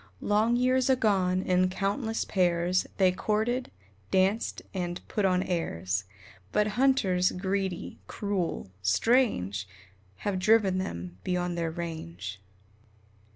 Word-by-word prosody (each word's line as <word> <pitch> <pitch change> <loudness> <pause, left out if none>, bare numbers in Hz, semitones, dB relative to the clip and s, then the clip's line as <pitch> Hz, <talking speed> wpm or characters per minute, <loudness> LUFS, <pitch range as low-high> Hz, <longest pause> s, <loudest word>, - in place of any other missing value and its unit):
Long 215 +3 +2
years 255 +1 +2
agone, 190 -7 +2
in 185 0 +2
countless 205 +5 -1
pairs 180 -1 +1
They 185 -2 +5
courted, 220 +6 -1 0.4
danced, 190 +4 +1
and 175 -2 -3
"put 210 -3 0
on 185 -1 +2
airs," 95 - -2 0.5
But 210 0 +2
hunters, 205 -7 +2
greedy, 190 -1 -3
cruel 190 - -3
strange! 100 - +2 0.6
Have 200 -2 0
driven 200 -2 +4
them 90 - -5
beyond 180 -1 -1
their 170 -1 -1
range. 105 - -6
185 Hz, 110 wpm, -28 LUFS, 170-210 Hz, 0.6 s, They